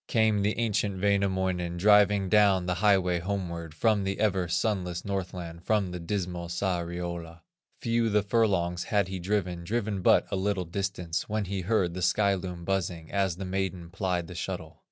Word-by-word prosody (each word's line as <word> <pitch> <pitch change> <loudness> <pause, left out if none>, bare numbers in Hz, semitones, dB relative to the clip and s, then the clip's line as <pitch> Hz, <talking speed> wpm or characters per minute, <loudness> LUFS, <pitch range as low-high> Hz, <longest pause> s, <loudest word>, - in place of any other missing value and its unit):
Came 110 -3 +2
the 105 +2 0
ancient 105 -4 0
Wainamoinen, 95 -3 0
Driving 105 0 +5
down 100 -2 +4
the 90 - 0
highway 95 -4 +3
homeward, 85 -4 -4
From 110 +1 +2
the 95 0 -2
ever 95 -4 +1
sunless 90 -1 -1
Northland, 90 -4 -4
From 105 -4 +1
the 90 - -5
dismal 90 -1 -3
Sariola; 85 -2 -3 0.4
Few 115 -1 +1
the 105 -1 +2
furlongs 95 -5 +1
he - - -12
had 95 -2 +1
driven, 90 -2 -1
Driven 105 0 -2
but - - +5
a - - 0
little 95 -1 0
distance, 90 -1 -3
When 105 -1 -1
he 95 0 -3
heard 95 -2 +1
the 95 - -5
sky 100 +2 +3
loom 90 -2 -5
buzzing, 90 -4 -2
As 95 -3 +1
the 95 +2 -6
maiden 95 -2 -3
plied 90 -2 -1
the - - -9
shuttle. - - -5
95 Hz, 170 wpm, -28 LUFS, 85-100 Hz, 0.4 s, Driving